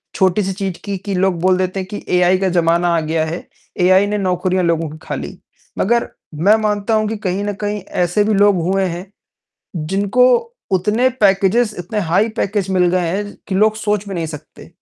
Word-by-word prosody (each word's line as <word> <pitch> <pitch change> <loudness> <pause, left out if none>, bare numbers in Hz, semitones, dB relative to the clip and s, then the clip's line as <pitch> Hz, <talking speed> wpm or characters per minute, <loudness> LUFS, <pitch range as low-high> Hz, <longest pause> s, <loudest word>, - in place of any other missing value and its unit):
छोटी-सी 190 +1 +1
चीज़ 190 -2 -4
की, 200 -1 -3
कि 195 +2 -5
लोग 185 -2 +1
बोल 185 0 +3
देते 185 +1 -1
हैं 185 - -5
कि 205 - -6
एआई 180 +1 +4
का 190 0 0
ज़माना 170 0 +2
आ - - +2
गया 160 0 -1
है, 165 +3 -6 0.3
एआई 185 +2 +5
ने 210 0 -1
नौकरियाँ 185 -1 0
लोगों 165 -2 0
की 155 - -10
खा - - -2
ली। - - -7 0.4
मगर 235 +4 +2 0.3
मैं 190 +8 +4
मानता 210 +1 0
हूँ 215 0 +2
कि 220 0 -3
कहीं 195 -1 -2
न 205 0 -2
कहीं 205 -1 -2 0.2
ऐसे 180 +4 +1
भी 215 - +1
लोग 205 0 +4
हुए 190 +3 +1
हैं, 175 +1 -4 0.8
जिनको 200 +6 +2 0.5
उतने 210 +7 +2
पैकेजेज़ 205 +3 +3
इतने 200 +5 -3
हाई 195 +4 +1
पैकेज 200 -1 -1
मिल 180 -2 +3
गए 180 -1 0
हैं, 195 +5 -1
ज - - -18
कि 190 - -2
लोग 215 +2 +3
सोच 210 -1 -2
भी 195 - -5
नहीं 170 -1 -2
सकते। 155 +2 -11
190 Hz, 205 wpm, -18 LUFS, 180-205 Hz, 0.8 s, एआई